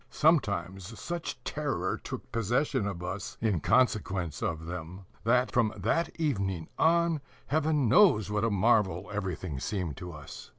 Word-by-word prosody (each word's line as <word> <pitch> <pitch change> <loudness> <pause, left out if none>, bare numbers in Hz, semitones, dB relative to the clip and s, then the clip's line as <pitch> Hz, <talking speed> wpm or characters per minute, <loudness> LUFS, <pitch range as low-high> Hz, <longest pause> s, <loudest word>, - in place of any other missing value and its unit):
Sometimes 100 - +1
such 175 -1 -4
terror - - -1
took - - -8
possession 115 0 0
of 90 -3 -5
us 95 +3 -5
in 105 -6 +1
consequence 95 - +1
of 80 0 -2
them, 90 +2 -7 0.2
that, 125 +2 +3
from 115 -4 +2
that 165 - +1
evening 100 - -1
on, 170 -1 +3 0.2
Heaven 150 -2 +1
knows 110 - +5
what 105 0 0
a 115 - +3
marvel 100 -3 +2
everything 90 -7 -3
seemed 90 -6 -3
to 90 -1 -7
us. 75 -3 -10
105 Hz, 140 wpm, -29 LUFS, 90-125 Hz, 0.2 s, knows